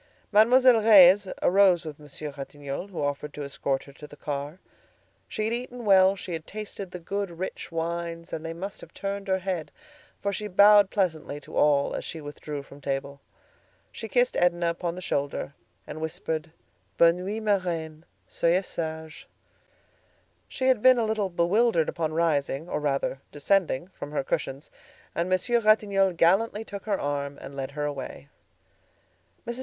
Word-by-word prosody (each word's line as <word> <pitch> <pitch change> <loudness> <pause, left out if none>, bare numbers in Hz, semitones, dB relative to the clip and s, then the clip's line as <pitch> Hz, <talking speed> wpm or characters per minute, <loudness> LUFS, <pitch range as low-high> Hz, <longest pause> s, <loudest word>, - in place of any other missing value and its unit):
Mademoiselle 240 +2 +6
Reisz 200 -2 +7 0.2
arose 185 -2 +4
with 155 -2 -7
Monsieur 150 0 -8
Ratignolle, 140 +3 -6
who 180 -7 -5
offered 145 +1 -3
to 150 - -5
escort 140 -1 -2
her 140 - -15
to 150 +2 -11
the 145 - -13
car. 145 +3 -4 0.7
She 215 - -3
had 225 - -1
eaten 245 0 -5
well; 190 -1 +6
she 185 -2 -7
had 160 -1 -6
tasted 205 -2 -6
the 180 - -7
good, 200 +3 -3
rich 185 0 -5
wines, 170 0 -4
and 160 - -4
they 165 - -4
must 190 +4 -6
have - - -14
turned 200 0 -4
her 190 0 +2
head, 185 -4 -4 0.5
for 200 0 -2
she 210 +2 -3
bowed 205 +1 +6
pleasantly 160 -7 -1
to - - -11
all 145 -1 +3
as - - -4
she 165 - -6
withdrew 145 -1 -7
from 140 +1 -15
table. 140 0 -4 0.7
She 225 - -7
kissed 245 +2 +2
Edna 175 -1 +2
upon 170 0 -4
the 185 - -8
shoulder, 140 -3 -2 0.3
and 155 - -8
whispered: 160 0 -4 0.5
"Bonne 170 +1 +5
nuit, 210 +4 -4
ma 205 -2 +3
reine; 160 -3 -4 0.2
soyez 175 +3 +1
sage." 160 -2 -6 1.2
She 260 - -4
had 260 -4 +3
been 255 +1 +7
a 230 - +1
little 215 -3 -1
bewildered 175 +1 +2
upon 160 -2 -2
rising, 155 -2 0
or - - -2
rather, 135 -2 -1
descending 170 0 0
from 150 -5 -9
her 145 - 0
cushions, 135 +1 -3 0.4
and 170 +2 -1
Monsieur 185 +6 +2
Ratignolle 200 -3 +3
gallantly 205 +6 +3
took 200 -2 -8
her 205 -3 0
arm 140 0 -3
and 135 - -9
led 135 -1 -4
her 150 - -1
away. 140 0 -6 1.2
Mrs. 235 +1 -4
170 Hz, 170 wpm, -26 LUFS, 150-200 Hz, 1.2 s, Reisz